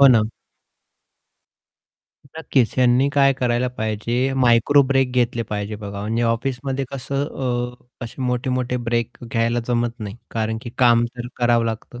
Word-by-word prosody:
हो 140 - +9
ना. 115 -4 +5 2.1
नक्कीच. 130 -7 +1
ह्यांनी 130 +1 +4
काय 140 -1 +5
करायला 125 -1 0
पाहिजे 120 +2 -1
मायक्रो 120 +4 +5
ब्रेक 135 -1 +1
घेतले 120 -2 +1
पाहिजे 105 0 -3
बघा, 100 -1 -7
म्हणजे 110 +3 -1
ऑफिसमध्ये 130 +3 -1
कसं 140 +1 -2
अ, 125 -2 -4
असे 120 +3 -7
मोठे-मोठे 125 0 -1
ब्रेक 115 -1 -1
घ्यायला 115 +1 +1
जमत 120 -1 +1
नाही 105 -1 -6
कारण 110 0 -2
की 120 - -7
काम 120 -2 +5
तर 120 0 -5
करावं 120 -1 +3
लागतं 115 +2 -5
120 Hz, 140 wpm, -21 LUFS, 115-130 Hz, 2.1 s, हो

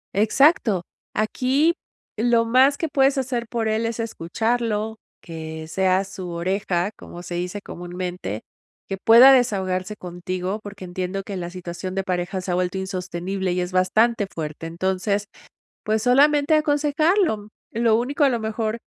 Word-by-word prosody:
Exacto. 215 - +3 0.3
Aquí 260 +9 +2 0.4
lo 230 +1 +3
más 260 +4 +4
que 325 - -1
puedes 275 -1 +2
hacer 245 -3 -2
por 230 -1 -2
él, 220 +1 0
es 230 0 -4
escucharlo, 220 +2 -1 0.3
que 160 -1 -7
seas 190 +3 +1
su 185 -2 -7
oreja, 180 +2 -1
como 175 0 -11
se 175 - -7
dice 180 +3 -3
comúnmente, 175 - -5 0.5
que 195 - -3
pueda 240 +4 +9
desahogarse 195 -5 +1
contigo, 185 +2 -4
porque 200 -2 -9
entiendo 185 +2 -4
que 200 - -6
la 175 -1 -4
situación 180 0 -6
de 195 - -1
pareja 185 +1 -2
se 180 - -4
ha - - +1
vuelto 180 +1 -1
insostenible 185 0 -3
y 180 - 0
es 180 +1 -3
bastante 205 +4 +2
fuerte. 155 0 -5
Entonces, 190 +4 -1 0.6
pues, 215 0 0
solamente 285 +4 +4
aconsejarlo. 300 - +2 0.2
Lo 230 -1 +3
único, 275 +6 -1
a 280 - +6
lo 245 -3 0
mejor, 220 0 -2
200 Hz, 150 wpm, -23 LUFS, 180-235 Hz, 0.6 s, pueda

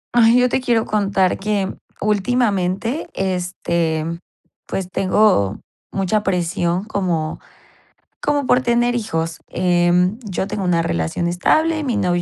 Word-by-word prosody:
Ay, 235 0 +6
yo 250 - +4
te 250 - 0
quiero 235 -3 +1
contar 195 -3 +1
que 200 -1 -1 0.3
últimamente, 210 - 0
este, 170 -4 -1 0.6
pues, 190 -2 -3
tengo 185 - +2 0.3
mucha 195 +2 0
presión 175 -1 0
como 175 -7 -2 0.8
como 290 -2 0
por 250 +1 +3
tener 240 0 +2
hijos. 165 -8 -2
Em, 180 +2 +2
yo 190 -2 -2
tengo 205 -1 -3
una 175 -2 +2
relación 85 - -1
estable, 310 - +1
mi 250 -5 -1
novio 180 -3 +1
195 Hz, 125 wpm, -20 LUFS, 175-225 Hz, 0.8 s, Ay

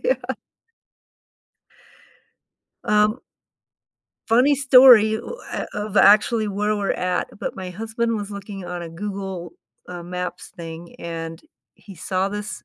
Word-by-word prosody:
Yeah. - - +3 2.7
Um 210 +3 +2 1.1
Funny 255 +5 +4
story, 255 -5 +7
ooh 480 - -6
eh - - -3
of 210 0 -5
actually 215 +2 +5
where 210 +2 0
we're 200 -1 -1
at, 180 0 -1
but - - -4
my 185 -1 -6
husband 225 +3 -2
was 205 -1 -5
looking 200 -2 -8
on 175 0 -5
a 170 - -6
Google, 190 0 -6 0.4
uh, 175 -1 -7
Maps 180 +1 -5
thing, 165 0 -9
and 165 -1 -6 0.3
he 195 - -14
saw 185 +3 -1
this 210 +1 -6
200 Hz, 125 wpm, -22 LUFS, 180-220 Hz, 2.7 s, story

